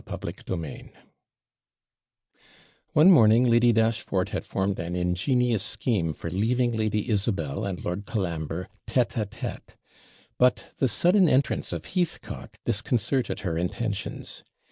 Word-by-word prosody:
CHAPTER - - -4 0.2
VIII 80 -4 -7 2.0
One 165 +6 +7
morning 115 -5 +6
Lady 120 0 +5
Dashfort 110 -4 +1
had - - -4
formed 95 0 -1
an 85 +2 -3
ingenious 105 +7 +1
scheme 90 -10 -1
for 85 - -6
leaving 120 +6 +1
Lady 110 -1 -1
Isabel 100 - -1
and 95 -3 -4
Lord 95 +3 -3
Colambre 85 -4 -3 0.2
TETE 125 -2 +1
A 110 - +1
TETE; - - -7 0.6
but 125 0 +2
the 135 - +3
sudden 175 - +4
entrance 135 +1 +1
of - - -5
Heathcock 180 -3 -4
disconcerted 120 +2 -1
her 85 -4 -2
intentions. 100 +3 -4
110 Hz, 120 wpm, -26 LUFS, 90-125 Hz, 2.0 s, One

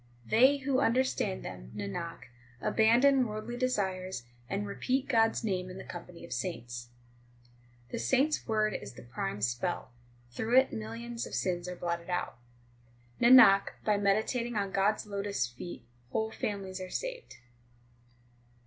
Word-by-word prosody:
They 260 +6 +5
who 270 -1 0
understand 250 - +1
them, - - -8
Nanak, 105 +12 -5 0.4
abandon 245 - +4
worldly 215 +3 -5
desires, 190 - -1 0.3
and 200 +1 -1
repeat 255 +6 -1
God 225 -4 +4
s 225 - -5
name 185 -4 -1
in 185 - -8
the 190 - -7
company 175 0 -9
of - - -6
saints. 120 -9 -4
ii 120 0 -30 0.4
The - - -3
saint 260 - +3
s 310 - -2
word 215 -2 +1
is - - -6
the - - -12
prime 105 -4 -4
spell; 120 +7 -1 0.4
through 225 - +1
it 265 0 +5
millions 230 +2 -5
of - - -6
sins 180 -1 -1
are 180 - -5
blotted 170 0 -3
out: 175 -8 -2 0.8
Nanak, 235 -5 +8
by 210 -1 +3
meditating 220 +4 +1
on 200 -2 -1
God 195 +2 +3
s - - -8
lotus 200 -3 -1
feet 120 +7 -8 0.3
whole 220 +9 -1
families 195 -3 -4
are 185 - -6
saved. - - -5
200 Hz, 150 wpm, -31 LUFS, 170-235 Hz, 0.8 s, Nanak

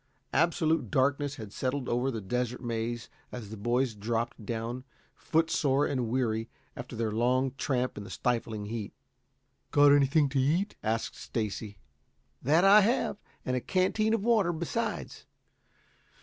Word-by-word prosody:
Absolute 160 -4 +2
darkness 140 +3 +1
had 110 -6 -9
settled 130 0 -2
over 125 +3 +1
the 115 -4 -3
Desert 125 +5 -2
Maze 115 0 -3 0.2
as 110 -5 -7
the - - -5
boys 120 +3 0
dropped 115 +2 -3
down, 115 +3 -4 0.3
footsore 150 -4 +1
and 130 -4 -1
weary 115 -2 0 0.3
after - - -7
their 110 -1 -1
long 125 +4 +2
tramp 130 -4 -1
in - - -6
the - - -10
stifling 115 -4 -2
heat. 110 -1 -5 0.8
"Got 145 0 +6
anything 145 +1 +4
to 135 0 0
eat?" 170 +10 +1
asked 110 +1 -1
Stacy. 105 -2 -4 0.6
"That 155 +7 +3
I 205 +2 +8
have, 220 0 +1 0.3
and 130 - 0
a 125 - -1
canteen 215 - +1
of 210 - -3
water 215 -6 +3
besides. 175 +8 -3
125 Hz, 145 wpm, -29 LUFS, 115-145 Hz, 0.8 s, I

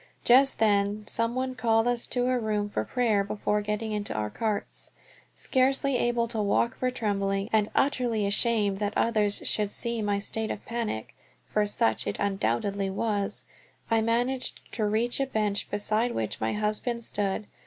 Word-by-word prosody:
Just 270 +3 +5
then 205 -1 +2
some 230 +2 -1
one 255 0 -1
called 225 -2 +2
us 245 -1 0
to 245 -1 0
a 255 0 +1
room 210 -2 -1
for 110 - -2
prayer 215 - +1
before 210 +1 -1
getting 210 +1 -3
into 210 -1 -2
our 105 -1 -2
carts. 215 -3 -3 0.5
Scarcely 270 +1 +1
able 240 -1 +1
to 225 -2 0
walk 220 +4 +1
for 255 - +1
trembling, 200 -3 -1
and 215 -1 +3
utterly 245 -6 +1
ashamed 205 -1 +2
that 205 0 -1
others 210 -3 +2
should 210 -1 0
see 235 0 -1
my 205 -1 0
state 215 +2 -2
of - - -5
panic, 230 - -4 0.3
for 210 -1 0
such 110 - +1
it 100 - -2
undoubtedly 195 - 0
was, 200 0 -1 0.5
I 225 0 +4
managed 245 +3 0
to 220 - -1
reach 230 +5 +1
a 275 - +1
bench 210 -4 -1
beside 215 +3 0
which 110 -1 -3
my 110 - 0
husband 215 +3 -1
stood. 205 0 -2
215 Hz, 165 wpm, -27 LUFS, 205-235 Hz, 0.5 s, Just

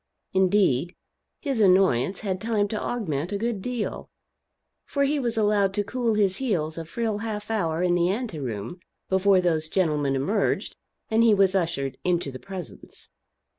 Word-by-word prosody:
Indeed 185 -5 +2 0.5
his 275 -6 -1
annoyance 185 - +3
had 190 -3 -3
time 220 -2 +1
to 215 - -3
augment 175 - -2
a 200 - -1
good 225 -1 -2
deal; 245 0 -4 0.7
for 280 - -1
he 285 +1 +1
was 235 -3 -1
allowed 205 -2 +2
to 205 - +1
cool 235 +1 -1
his 195 -3 +2
heels 165 -11 -1
a 165 - -6
full 220 +4 -2
half 215 -1 -4
hour 170 -6 0
in 180 -1 +2
the 175 0 +2
ante 210 -5 -3
room 120 - -5 0.3
before 190 0 +4
those 160 -3 0
gentlemen 150 -7 +1
emerged 195 +10 0 0.4
and 220 +1 +4
he 225 -2 +5
was 195 -1 +4
ushered 165 -8 -1
into 175 -5 0
the 130 - -8
presence. 190 -4 -9
195 Hz, 165 wpm, -25 LUFS, 170-220 Hz, 0.7 s, he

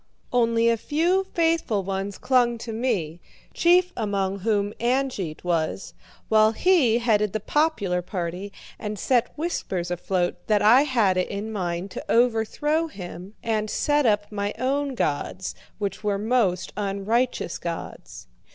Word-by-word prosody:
Only 230 -1 +3
a 230 0 +3
few 340 - +1
faithful 325 - +1
ones 195 +1 -3
clung 245 -2 +2
to 225 0 -6
me, 205 -9 -1 0.3
chief 360 +1 +4
among 200 -3 -1
whom 205 0 0
Angeit 240 - -1
was; 170 +1 -1 0.3
while 215 0 +4
he 275 -7 +3
headed 210 -4 +1
the 215 - -1
popular 210 - 0
party 180 +1 -4 0.3
and 210 0 -4
set 245 +3 +1
whispers 190 - -3
afloat 175 0 -1
that 210 -2 +3
I 245 +7 +6
had 225 -9 +2
it 185 - +1
in 210 +2 -4
mind 180 -2 -3
to - - -7
overthrow 250 +7 +2
him 185 - -9
and 215 -2 -1
set 290 +1 +2
up 205 -1 +1
my 205 -1 -2
own 270 +2 -1
gods, 185 +1 -2 0.2
which 200 0 -4
were 205 -1 +1
most 210 -4 0
unrighteous 205 +2 -1
gods. 170 -1 -7
215 Hz, 140 wpm, -24 LUFS, 195-250 Hz, 0.3 s, I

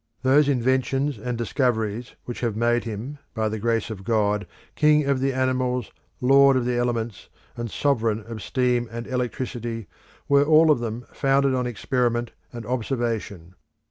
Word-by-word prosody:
Those 140 +2 +4
inventions 130 +2 +1
and 125 -1 -3
discoveries 115 -1 -1
which 120 - -6
have 115 -4 -1
made 120 +1 +1
him, 115 +7 -6 0.2
by 110 -1 0
the 110 0 -4
grace 115 0 0
of 100 -3 -7
God, 105 -1 +1 0.3
king 150 -1 +4
of 140 -1 +1
the 135 +1 +1
animals, 130 -2 -1 0.3
lord 135 +1 +5
of 125 - 0
the 125 0 0
elements, 120 -3 -2 0.3
and 120 -1 -4
sovereign 115 -5 0
of 115 -2 -7
steam 125 -2 0
and 115 0 -5
electricity, 120 -2 -3 0.4
were 140 0 +5
all 155 +1 +6
of 145 - +3
them 120 +1 -4
founded 135 -1 +2
on 125 -1 0
experiment 120 0 -1 0.2
and 120 -2 -8
observation. 115 -8 -3
120 Hz, 155 wpm, -24 LUFS, 115-130 Hz, 0.4 s, all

